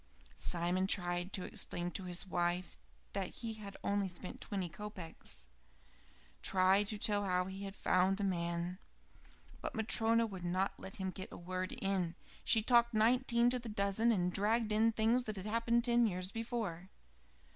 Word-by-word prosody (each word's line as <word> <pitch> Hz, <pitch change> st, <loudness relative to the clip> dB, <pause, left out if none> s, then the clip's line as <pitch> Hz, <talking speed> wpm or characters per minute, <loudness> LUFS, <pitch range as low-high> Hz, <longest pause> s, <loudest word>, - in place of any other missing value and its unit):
Simon 180 Hz, +2 st, +1 dB
tried 175 Hz, -1 st, 0 dB
to 185 Hz, -, -1 dB
explain 175 Hz, 0 st, 0 dB
to 185 Hz, +3 st, -4 dB
his 180 Hz, 0 st, 0 dB
wife 175 Hz, 0 st, -1 dB, 0.4 s
that 195 Hz, -2 st, -1 dB
he 230 Hz, +2 st, -5 dB
had 205 Hz, -2 st, -9 dB
only 200 Hz, -1 st, +1 dB
spent 180 Hz, 0 st, -9 dB
twenty 195 Hz, -4 st, -2 dB
kopeks; 170 Hz, -, -6 dB, 0.9 s
tried 190 Hz, +2 st, +4 dB
to 210 Hz, -, -4 dB
tell 205 Hz, 0 st, +1 dB
how 180 Hz, -1 st, +1 dB
he 190 Hz, +1 st, -6 dB
had 195 Hz, 0 st, -7 dB
found 185 Hz, +1 st, +2 dB
the 205 Hz, -, -2 dB
man 170 Hz, -1 st, -1 dB, 0.8 s
but -, -, -4 dB
Matryona 225 Hz, +1 st, +4 dB
would 190 Hz, -5 st, -7 dB
not 185 Hz, +3 st, -1 dB
let 195 Hz, -, -8 dB
him 190 Hz, -1 st, -3 dB
get 190 Hz, 0 st, -7 dB
a -, -, -8 dB
word 185 Hz, +1 st, -4 dB
in. 185 Hz, -4 st, -1 dB, 0.3 s
She 220 Hz, -2 st, +3 dB
talked 235 Hz, 0 st, +4 dB
nineteen 235 Hz, +1 st, +3 dB
to 250 Hz, -, 0 dB
the 235 Hz, -1 st, -7 dB
dozen, 210 Hz, +2 st, +2 dB
and 180 Hz, -4 st, +1 dB
dragged 215 Hz, +2 st, +2 dB
in 220 Hz, +2 st, +4 dB
things 225 Hz, +3 st, +2 dB
that 215 Hz, -, -4 dB
had 190 Hz, -1 st, -6 dB
happened 230 Hz, +2 st, +2 dB
ten 240 Hz, -1 st, +4 dB
years 185 Hz, -1 st, -3 dB
before. 220 Hz, -6 st, -4 dB
195 Hz, 165 wpm, -35 LUFS, 180-225 Hz, 0.9 s, tried